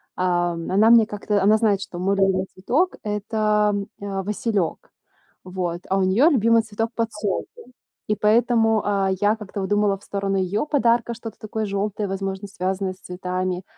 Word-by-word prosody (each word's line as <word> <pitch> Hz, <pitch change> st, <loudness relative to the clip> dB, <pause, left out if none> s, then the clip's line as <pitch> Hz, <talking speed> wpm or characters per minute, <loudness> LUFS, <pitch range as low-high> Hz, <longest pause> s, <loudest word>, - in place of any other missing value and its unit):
Ам. 175 Hz, -2 st, -1 dB
Она 210 Hz, +4 st, +5 dB
мне 230 Hz, -1 st, +7 dB
как-то 210 Hz, -1 st, -1 dB
она 210 Hz, +2 st, +5 dB
знает, 210 Hz, -3 st, +2 dB
что 185 Hz, -2 st, -7 dB
мой 195 Hz, +2 st, +1 dB
любимый 190 Hz, -1 st, +2 dB
цветок- 270 Hz, -, 0 dB
это, 210 Hz, 0 st, +1 dB
м, 200 Hz, 0 st, -3 dB
а, 195 Hz, -1 st, -3 dB
василёк. 205 Hz, -3 st, -2 dB, 0.5 s
Вот. 180 Hz, -2 st, -4 dB
А 195 Hz, -, +2 dB
у -, -, +2 dB
неё 210 Hz, -, +4 dB
любимый 230 Hz, -5 st, +4 dB
цветок- 225 Hz, +1 st, -3 dB
подсолнух. 210 Hz, -4 st, -2 dB, 0.6 s
И 210 Hz, -, +1 dB
поэтому, 225 Hz, +1 st, +3 dB
а, 195 Hz, -2 st, +1 dB
я 205 Hz, +1 st, +3 dB
как-то 210 Hz, -1 st, -6 dB
вот 190 Hz, -, -3 dB
думала 205 Hz, -1 st, +2 dB
в 195 Hz, -, -23 dB
сторону 195 Hz, -1 st, -2 dB
её 190 Hz, +6 st, 0 dB
подарка 240 Hz, -5 st, +1 dB
что-то 225 Hz, -1 st, -9 dB
такое 215 Hz, 0 st, -3 dB
жёлтое, 205 Hz, +1 st, -2 dB
возможно, 195 Hz, +1 st, -4 dB
связанное 190 Hz, 0 st, -2 dB
с 185 Hz, -, -22 dB
цветами. 180 Hz, 0 st, -3 dB
205 Hz, 170 wpm, -23 LUFS, 190-220 Hz, 0.6 s, мне